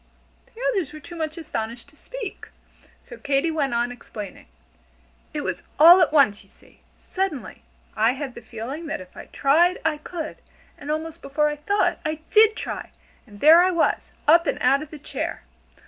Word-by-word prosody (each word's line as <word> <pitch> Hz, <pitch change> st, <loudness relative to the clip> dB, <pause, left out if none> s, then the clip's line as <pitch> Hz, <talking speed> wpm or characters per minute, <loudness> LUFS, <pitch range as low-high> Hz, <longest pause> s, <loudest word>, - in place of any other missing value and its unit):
The 460 Hz, -, -18 dB
others 360 Hz, -, -2 dB
were 305 Hz, -, -8 dB
too 345 Hz, +3 st, -11 dB
much 315 Hz, -1 st, -4 dB
astonished 235 Hz, -5 st, -5 dB
to 295 Hz, -, -20 dB
speak, 475 Hz, +5 st, -8 dB, 0.6 s
so -, -, -11 dB
Katy 285 Hz, +3 st, 0 dB
went 280 Hz, -6 st, -1 dB
on 240 Hz, +1 st, 0 dB
explaining. 210 Hz, -5 st, -9 dB, 0.8 s
"It -, -, -3 dB
was -, -, -3 dB, 0.2 s
all 345 Hz, +5 st, +9 dB
at 340 Hz, -, +3 dB
once, 265 Hz, -9 st, +4 dB
you 195 Hz, -, -21 dB
see. -, -, -24 dB, 0.2 s
Suddenly, 375 Hz, -8 st, -4 dB, 0.3 s
I 225 Hz, +3 st, +3 dB
had 270 Hz, -1 st, -6 dB
the -, -, -10 dB
feeling 240 Hz, +8 st, -7 dB
that -, -, -3 dB
if 185 Hz, -1 st, -13 dB
I -, -, -9 dB
tried 335 Hz, +6 st, +3 dB
I 305 Hz, -2 st, +1 dB
could, 315 Hz, 0 st, -6 dB, 0.4 s
and 290 Hz, -, -10 dB
almost 320 Hz, +2 st, -3 dB
before 300 Hz, +2 st, 0 dB
I 295 Hz, -, -3 dB
thought, 400 Hz, +8 st, 0 dB
I 310 Hz, 0 st, -3 dB
did 435 Hz, 0 st, +6 dB
try, -, -, -5 dB, 0.4 s
and 205 Hz, -2 st, -15 dB
there 320 Hz, +3 st, +8 dB
I 365 Hz, -, +4 dB
was, 340 Hz, -3 st, 0 dB, 0.2 s
up 335 Hz, +2 st, +6 dB
and -, -, 0 dB
out 275 Hz, +1 st, +3 dB
of 305 Hz, -, -8 dB
the 305 Hz, -, -9 dB
chair. -, -, -5 dB
305 Hz, 185 wpm, -23 LUFS, 270-335 Hz, 0.8 s, all